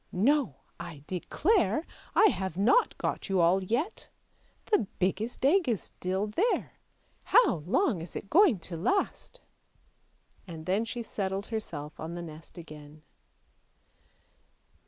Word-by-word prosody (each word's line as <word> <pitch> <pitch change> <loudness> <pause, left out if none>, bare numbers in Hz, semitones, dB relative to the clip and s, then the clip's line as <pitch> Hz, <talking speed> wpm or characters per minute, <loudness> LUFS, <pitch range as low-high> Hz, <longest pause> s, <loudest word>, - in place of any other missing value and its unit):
" - - -40 0.2
No! 280 - 0 0.2
I 170 -5 -8
declare 230 - +1 0.3
I 435 - +7
have 190 - -3
not 245 - +3
got - - -3
you 190 -1 +2
all 175 +3 +4
yet! 245 - -2 0.6
The 415 - +2
biggest 210 +7 -1
egg 330 0 +4
is 220 -5 0
still 190 +3 -2
there; 350 - -1 0.5
how 475 - +5
long 225 - +2
is 165 - -8
it - - -5
going 350 - +6
to 170 0 -6
last? 395 - -1 0.5
" - - -38
and 160 -3 -8
then 195 +5 +1
she 235 +1 -5
settled 195 -2 -3
herself 155 -10 -6
on 165 +2 -5
the 175 - -5
nest 160 +1 -11
again. 150 -2 -11
195 Hz, 135 wpm, -29 LUFS, 170-275 Hz, 0.6 s, I